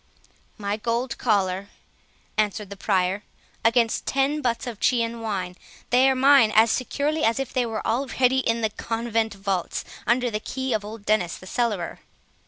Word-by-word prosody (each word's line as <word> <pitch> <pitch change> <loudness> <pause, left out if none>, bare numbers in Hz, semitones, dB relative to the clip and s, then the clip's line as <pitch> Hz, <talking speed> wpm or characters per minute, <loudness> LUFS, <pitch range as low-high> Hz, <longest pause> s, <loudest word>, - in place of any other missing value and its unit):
"My 205 0 -2
gold 235 +2 -2
collar," 195 -4 +1 0.7
answered 210 -1 -1
the - - -5
Prior, 190 0 0 0.4
"against 230 0 +2
ten 275 +3 +1
butts 235 -4 -1
of 235 -4 -6
Chian 235 -2 +1
wine;—they 215 +5 0
are 265 - +2
mine 265 -4 +6
as 220 +1 +6
securely 290 +4 -1
as 225 0 +3
if 270 -2 -4
they 250 -2 +1
were 225 -1 -4
already 260 +1 +2
in 230 -2 0
the 220 -1 0
convent 225 -1 -2
vaults, 195 -2 -2 0.2
under 245 +1 +2
the 210 - -1
key 260 +3 -3
of 215 -2 0
old 210 0 -9
Dennis 195 -5 +1
the - - -13
cellarer." 205 -4 -2
230 Hz, 160 wpm, -24 LUFS, 205-250 Hz, 0.7 s, mine